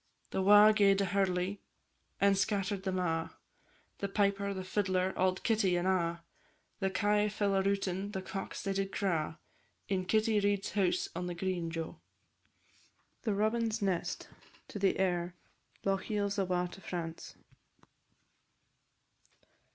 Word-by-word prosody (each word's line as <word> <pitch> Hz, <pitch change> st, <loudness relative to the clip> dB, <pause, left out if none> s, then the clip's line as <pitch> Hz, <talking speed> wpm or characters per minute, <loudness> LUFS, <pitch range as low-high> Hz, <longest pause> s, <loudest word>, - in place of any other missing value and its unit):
The 190 Hz, -, 0 dB
wa' 205 Hz, +2 st, +8 dB
gaed 200 Hz, -2 st, +4 dB
a -, -, +2 dB
hurley, 190 Hz, 0 st, 0 dB, 0.6 s
and 200 Hz, 0 st, +4 dB
scatter'd 195 Hz, 0 st, -1 dB
them 190 Hz, -1 st, -1 dB
a', 165 Hz, -3 st, -1 dB, 0.6 s
The 200 Hz, -, -1 dB
piper, 200 Hz, 0 st, +1 dB
the 190 Hz, -1 st, -4 dB
fiddler, 185 Hz, -1 st, 0 dB
auld 185 Hz, 0 st, +1 dB
Kitty, 205 Hz, -5 st, +2 dB
and 175 Hz, +1 st, 0 dB
a'; 170 Hz, -2 st, 0 dB, 0.6 s
The 195 Hz, -2 st, +1 dB
kye 210 Hz, +1 st, +2 dB
fell 205 Hz, -1 st, 0 dB
a 195 Hz, -, +3 dB
routin', 195 Hz, 0 st, -1 dB
the 190 Hz, -2 st, -4 dB
cocks 195 Hz, +1 st, -5 dB
they 195 Hz, -, -1 dB
did 195 Hz, 0 st, -1 dB
craw, 165 Hz, -7 st, -1 dB, 0.5 s
In 185 Hz, -2 st, 0 dB
Kitty 215 Hz, +1 st, +2 dB
Reid's 200 Hz, -1 st, 0 dB
house 190 Hz, -4 st, +1 dB
on 180 Hz, -, -3 dB
the 175 Hz, -, -4 dB
green, 175 Hz, -1 st, -2 dB
Jo! 165 Hz, -1 st, -5 dB, 1.2 s
THE 215 Hz, -4 st, 0 dB
ROBIN'S 220 Hz, +1 st, 0 dB
NEST. 185 Hz, -3 st, -1 dB, 0.6 s
AIR 180 Hz, -2 st, +1 dB, 0.5 s
_"Lochiel's 200 Hz, +1 st, 0 dB
awa' 180 Hz, -2 st, 0 dB
to 195 Hz, -, -11 dB
France." 165 Hz, -3 st, -6 dB
195 Hz, 130 wpm, -32 LUFS, 180-205 Hz, 1.2 s, wa